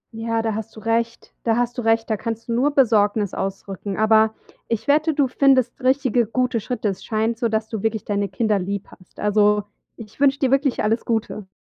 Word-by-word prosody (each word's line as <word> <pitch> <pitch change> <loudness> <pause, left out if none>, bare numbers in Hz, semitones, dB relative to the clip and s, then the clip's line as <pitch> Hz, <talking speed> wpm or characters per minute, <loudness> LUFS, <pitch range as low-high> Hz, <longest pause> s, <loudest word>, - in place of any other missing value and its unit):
Ja, 225 0 -1
da 225 -1 -1
hast 220 +1 -6
du - - -9
recht. 230 +1 -2
Da 225 0 +1
hast 240 0 0
du 245 - -1
recht, 225 0 +2
da 220 - 0
kannst 230 +2 -5
du 235 - -2
nur 265 +5 +2
Besorgnis 210 -5 +3
ausdrücken, 195 0 -5
aber 220 0 +4 0.3
ich 230 +4 -3
wette, 310 +2 +3
du 285 -2 +3
findest 255 -1 +2
richtige, 255 -3 +2
gute 250 0 0
Schritte. 230 -1 -2
Es 195 - -6
scheint 225 +1 -1
so, 235 -3 +1
dass 220 0 -1
du 220 -3 -5
wirklich 220 -1 -2
deine 200 -1 -1
Kinder 215 -4 0
lieb 200 +2 -4
hast. 185 - -19
Also, 210 0 +3 0.3
ich 215 +3 -12
wünsche 280 -1 +4
dir 265 -2 +1
wirklich 275 -3 +1
alles 225 +2 +1
Gute. 220 -3 -2
225 Hz, 205 wpm, -22 LUFS, 210-245 Hz, 0.3 s, aber